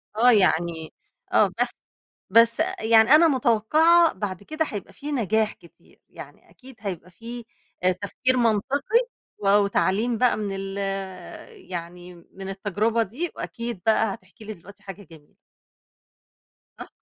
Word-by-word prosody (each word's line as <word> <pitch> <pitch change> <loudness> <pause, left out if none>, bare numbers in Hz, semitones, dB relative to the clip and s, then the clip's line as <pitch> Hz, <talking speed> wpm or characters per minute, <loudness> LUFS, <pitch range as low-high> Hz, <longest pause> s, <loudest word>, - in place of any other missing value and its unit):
آه 245 +3 +5
يعني 170 -5 +1 0.4
آه، - - +5
بس - - +3 0.6
بس 230 +1 +5 0.2
يعني 220 0 +4
أنا 320 +2 +7
متوقعة 305 +7 +3
بعد 190 -1 -5
كده 310 +7 -2
هيبقى 205 -3 -7
في 295 +1 -7
نجاح 220 -4 0
كتير، 170 - -22
يعني - - -13
أكيد 260 0 -15
هيبقى 180 -4 -6
في 235 +4 -9 0.4
آآ، 185 - +4
تفكير 200 +7 -1
منطقي، 275 - +1 0.3
و 195 - 0
وتعليم 205 +3 +2
بقى 250 -3 +3
من 210 -2 -3
ال 195 0 -6 0.9
يعني 175 +1 -7
من 190 +3 -11
التجربة 210 +4 0
دي، 280 - -5
وأكيد 235 -5 -6
بقى 220 -2 +3
هتحكي 200 +4 -17
لي 215 - -6
دلوقتي 200 +4 -17
حاجة 200 +1 -9
جميلة. 150 -2 -17 1.4
آه. - - -8
215 Hz, 135 wpm, -24 LUFS, 190-240 Hz, 1.4 s, أنا